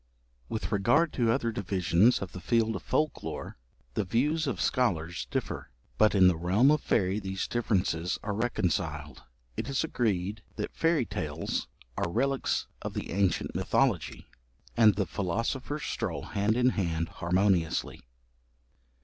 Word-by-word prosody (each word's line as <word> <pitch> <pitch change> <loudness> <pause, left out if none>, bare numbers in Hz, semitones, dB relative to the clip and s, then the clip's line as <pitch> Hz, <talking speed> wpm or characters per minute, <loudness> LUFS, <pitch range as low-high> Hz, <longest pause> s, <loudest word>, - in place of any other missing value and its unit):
With 110 - -3
regard 120 +11 +3
to 115 -3 +2
other 115 -1 0
divisions 100 +2 +2
of 95 - -7
the 90 - -7
field 115 +2 +1
of - - -4
folk 155 -1 0
lore, - - -6 0.3
the 105 - 0
views 145 - +1
of - - -2
scholars 90 - 0
differ, - - -3 0.3
but 110 -1 +5
in 95 -2 +7
the 90 - +4
realm 95 - +3
of 150 - +2
faerie 95 +2 +1
these 95 -1 -3
differences 90 -7 0
are 105 - -2
reconciled; 85 - -2 0.3
it - - -4
is 140 +2 0
agreed 105 - -1
that - - -4
fairy 165 -6 +2
tales 80 -4 -3 0.3
are - - 0
relics 135 +8 0 0.2
of - - -5
the - - -4
ancient 95 0 +1
mythology; - - 0 0.5
and 110 -4 +6
the 100 - 0
philosophers 115 - -2
stroll 85 -11 -3
hand 105 +3 0
in 125 0 +4
hand 85 -7 -1
harmoniously. 90 -1 +1
100 Hz, 145 wpm, -29 LUFS, 90-120 Hz, 0.5 s, in